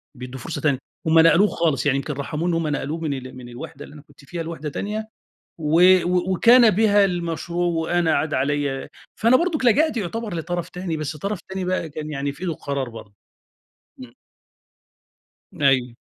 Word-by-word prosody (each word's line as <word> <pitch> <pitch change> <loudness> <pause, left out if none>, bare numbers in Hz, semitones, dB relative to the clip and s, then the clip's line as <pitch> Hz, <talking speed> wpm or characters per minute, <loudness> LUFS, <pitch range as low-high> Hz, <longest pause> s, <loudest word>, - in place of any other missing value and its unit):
بيدّوا 125 +1 -8
فرصة 160 +6 -5
تانية 140 -4 +1 0.3
هم 165 +1 +5
نقلوه 165 +5 +6
خالص 155 -8 0
يعني 135 -1 +3
يمكن 150 +2 -3
رحموه 150 +4 -3
إن - - +1
هم 165 -1 0
نقلوه 150 +2 -2
من 155 -3 -2
ال 130 -1 -7
من 120 -1 -10
الوحدة 125 +4 -9
اللي - - -14
أنا 150 - -12
كنت 140 - -20
فيها 170 +3 -5
لوحدة 160 -2 -5
تانية، 215 +7 -4 0.5
و 160 +2 +2 0.2
و 180 +1 0
وكان 235 +4 +6
بها 205 0 +4
المشروع 175 -1 -2
وأنا 170 0 +1
عاد 155 0 -1
عليَّ 140 0 -1 0.3
فأنا 235 +3 +4
برضك 330 -6 0
لجأت 285 +3 +3
يُعتبر 215 +1 -4
لطرف 175 +1 -3
تاني، 180 -3 -4
بس 155 0 -4
طرف 200 +4 -3
تاني 190 -1 -3
بقى 180 -3 -1
كان 155 +1 -6
يعني 140 0 -2
في 145 +5 -15
ايدُه 180 - -1
القرار 140 -4 -4
برضه، 110 -3 -11 0.9
امم. 125 -2 -11 1.5
أيوه. 130 -3 +2
165 Hz, 180 wpm, -22 LUFS, 140-180 Hz, 1.5 s, نقلوه